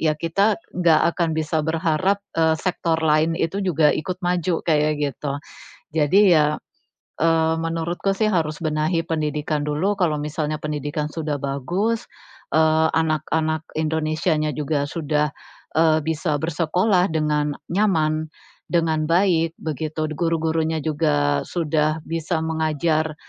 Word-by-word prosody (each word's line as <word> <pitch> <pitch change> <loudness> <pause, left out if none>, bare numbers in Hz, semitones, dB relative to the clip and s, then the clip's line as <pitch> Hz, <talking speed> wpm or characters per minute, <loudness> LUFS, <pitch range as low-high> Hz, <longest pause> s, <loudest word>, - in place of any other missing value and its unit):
ya 155 -1 +2
kita 195 +7 +1 0.2
nggak 170 -3 +3 0.2
akan 170 -2 +1
bisa 155 0 0
berharap, 165 +4 +1 0.2
eee, 160 -1 +3
sektor 170 -1 -1
lain 160 +1 +2
itu 195 +5 -1
juga 160 -5 +3
ikut 185 +3 -3
maju, 175 -1 0
kayak 155 -2 +2
gitu. 140 0 -3 0.7
Jadi 155 +6 +4 0.2
ya, 150 0 +2 0.6
eee, 160 0 +3
menurutku 165 +4 -1
sih 215 - +2
harus 160 -6 0
benahi 155 +1 0
pendidikan 150 -1 -1
dulu, 155 +8 0
kalau 165 -6 +1
misalnya 150 +1 -2
pendidikan 150 0 -3
sudah 150 -2 -3
bagus, 175 - -2 0.4
eee, 160 0 +4
anak-anak 155 0 0
Indonesianya 155 0 0
juga 145 -1 0
sudah, 150 -2 0 0.5
eee, 160 -1 +4
bisa 160 0 -1
bersekolah 180 +4 +1
dengan 150 -2 0 0.2
nyaman, 160 -6 +1 0.4
dengan 160 -3 +1
baik, 165 -2 +2
begitu, 155 0 -3
guru-gurunya 160 0 0
juga 75 - +1
sudah 155 -2 0
bisa 165 0 -2
mengajar, 160 0 0
160 Hz, 120 wpm, -22 LUFS, 155-165 Hz, 0.7 s, Jadi